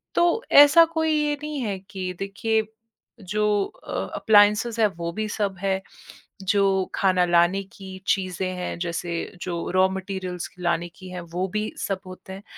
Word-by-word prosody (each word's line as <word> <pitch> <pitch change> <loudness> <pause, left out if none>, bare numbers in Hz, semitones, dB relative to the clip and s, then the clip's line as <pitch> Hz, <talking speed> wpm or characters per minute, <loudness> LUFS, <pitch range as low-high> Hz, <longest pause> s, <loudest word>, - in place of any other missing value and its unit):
तो 345 +7 +3
ऐसा 290 +4 +9
कोई 320 0 +2
ये 300 -1 +1
नहीं 300 -1 -4
है 205 -5 -2
कि 185 -2 -4
देखिए, 220 +3 0 0.6
जो 210 +1 +1
अ, - - -11 0.2
अप्लायंसेस 215 +2 +4
हैं 220 - +5
वो 170 0 -3
भी 215 +3 -2
सब 200 -2 -2
है, 195 -1 0 0.6
जो 195 -1 +2
खाना 185 -2 +3
लाने 175 +3 +3
की 190 -1 -9
चीज़ें 185 -1 0
हैं, 180 0 -4
जैसे 170 0 -3 0.3
जो 170 -2 -3
रॉ 185 0 +5
मैटीरियल्स 190 -2 -5
लाने 175 -1 -1
की 185 0 -11
हैं, 180 0 -6
वो 175 +2 -3
भी 215 0 -1
सब 195 -2 -2
होते 185 +1 -10
हैं। 195 +1 -10
195 Hz, 160 wpm, -24 LUFS, 180-210 Hz, 0.6 s, ऐसा